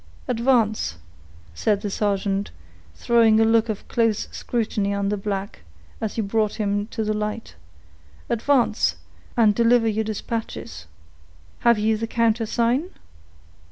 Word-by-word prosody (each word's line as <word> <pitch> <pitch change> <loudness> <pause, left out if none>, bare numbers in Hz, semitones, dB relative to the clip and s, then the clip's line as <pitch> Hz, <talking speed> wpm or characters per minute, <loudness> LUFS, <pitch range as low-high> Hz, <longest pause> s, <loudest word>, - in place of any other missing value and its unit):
"Advance," 230 - +1 0.6
said 200 - 0
the 205 -2 -3
sergeant, 200 -1 -1 0.5
throwing 225 - +4
a 225 - +5
look 225 0 +3
of 215 - -4
close 230 -3 +1
scrutiny 210 -4 -2
on 200 0 -1
the 210 - 0
black, 200 0 -4 0.4
as 220 -2 -3
he 225 - -1
brought 215 +1 0
him 205 -1 -1
to 225 -1 -3
the 215 0 0
light; 210 +1 -4 0.7
"advance, 230 - +2 0.4
and 220 -3 +5
deliver 235 +1 +3
your 220 0 0
dispatches. 215 - -5 0.7
Have 235 -1 +4
you 215 +1 +1
the 225 +1 -3
countersign?" 230 +6 +1
220 Hz, 125 wpm, -23 LUFS, 205-230 Hz, 0.7 s, a